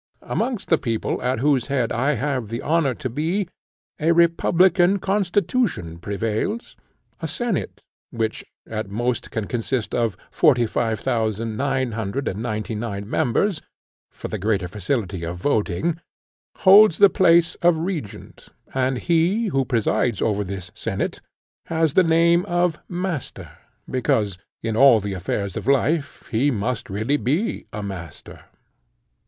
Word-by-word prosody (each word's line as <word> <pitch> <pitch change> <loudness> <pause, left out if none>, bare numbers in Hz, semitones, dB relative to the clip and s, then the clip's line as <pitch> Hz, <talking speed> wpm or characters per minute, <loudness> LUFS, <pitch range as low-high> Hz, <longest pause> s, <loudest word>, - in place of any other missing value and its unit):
Amongst 235 -3 -2
the 165 - +4
people, 115 -4 -2
at 125 -1 -1
whose 135 -3 +2
head 130 -4 0
I 135 +5 +1
have 130 -2 -2
the 115 +4 -5
honour 150 -5 +1
to 130 - -4
be, 165 - -1 0.5
a 165 +2 +3
republican 175 +2 +4
constitution 195 - 0
prevails. 110 - -3 0.5
A - - -2
senate, 235 -8 -3 0.3
which 110 -1 -3 0.2
at 110 -2 -5
most 120 +4 -2
can 110 -2 -3
consist 120 +1 -2
of 115 -5 0
forty 130 -7 +4
five 110 0 -1
thousand, 110 -2 -1
nine 130 0 0
hundred 110 +4 -3
and 100 - -3
ninety 110 -1 -3
nine 105 -2 -4
members, 160 - 0 0.5
for - - -8
the - - -4
greater 100 -2 0
facility 100 -1 -3
of 85 +1 -4
voting, 140 - 0 0.6
holds 195 -2 +8
the 200 - +8
place 170 -3 +4
of 170 -1 +4
regent; 155 - -6 0.3
and 130 0 0
he, 175 - +1
who 135 -5 +1
presides 115 -2 0
over 105 -2 0
this 95 -2 -6
senate, - - -3 0.5
has 160 -3 +1
the 185 - +5
name 170 +1 +4
of 175 -3 +1
master, 175 -5 -4 0.4
because, 105 -7 0 0.2
in 115 -1 -1
all 130 -1 +7
the 100 -1 -4
affairs 95 +1 -3
of - - -5
life, 140 +2 +1
he 125 +5 +2
must 115 -1 -2
really 110 +9 0
be 150 - -1
a 105 0 -5
master. 90 -6 -8
130 Hz, 140 wpm, -22 LUFS, 110-165 Hz, 0.6 s, holds